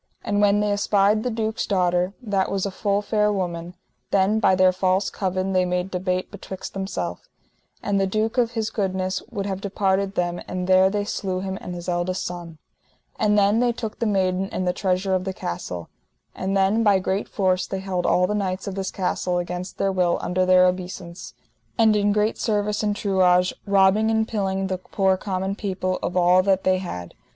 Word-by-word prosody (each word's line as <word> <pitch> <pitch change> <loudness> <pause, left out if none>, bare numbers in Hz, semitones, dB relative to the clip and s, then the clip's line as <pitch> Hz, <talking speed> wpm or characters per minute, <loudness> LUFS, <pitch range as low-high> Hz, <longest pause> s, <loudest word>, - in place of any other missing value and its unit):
And 205 0 0
when 205 0 +4
they 210 0 +1
espied 205 +1 +2
the 250 - -1
duke's 220 -1 -2
daughter, 180 -1 +1
that 200 -4 0
was 195 -1 -1
a 200 - -2
full 200 +2 0
fair 210 0 +1
woman, 175 -3 -3 0.3
then 200 +3 +2
by 190 -3 +4
their 185 0 +5
false 185 +1 0
covin 190 0 -2
they 185 0 +3
made 180 +1 -2
debate 185 0 -2
betwixt 190 -2 -8
themself, 90 - -4 0.5
and 200 -1 +1
the 195 - +2
duke 220 +5 0
of 235 -1 +1
his 220 -2 -2
goodness 190 -2 -1
would 200 - -4
have 195 -1 -3
departed 195 0 0
them, 175 0 -1
and 185 0 -3
there 185 +1 +5
they 205 0 -1
slew 185 -3 -3
him 190 0 -3
and 180 - -6
his 175 0 -8
eldest 180 +1 -1
son. 175 -2 -7 0.6
And 210 0 +3
then 205 +2 +4
they 245 0 +3
took 225 -2 -6
the 230 - 0
maiden 190 -1 0
and 185 - -2
the 180 - +2
treasure 190 0 0
of 185 -1 +1
the 190 0 -3
castle. 85 - -5 0.5
And 195 +1 -1
then 195 +4 +3
by 205 -3 +4
great 190 +2 -2
force 185 -2 0
they 195 - -3
held 190 -2 -2
all 180 - +3
the 205 - -1
knights 190 -2 -2
of 200 - -4
this 190 0 -3
castle 180 -1 -1
against 180 +1 -4
their 195 - +1
will 180 -2 +1
under 185 +1 0
their 185 0 +6
obeissance, 180 -1 -4 0.4
and 220 -2 +5
in 205 0 +2
great 210 +1 +1
service 210 -1 0
and 210 -1 0
truage, 180 -3 +3
robbing 200 +2 +4
and 220 0 +1
pilling 195 -3 -1
the 190 -1 -2
poor 190 0 +1
common 190 0 -3
people 185 -2 -2
of 180 - -2
all 180 +1 +5
that 190 0 +1
they 185 0 +2
had. 90 - -6
190 Hz, 200 wpm, -23 LUFS, 185-205 Hz, 0.6 s, their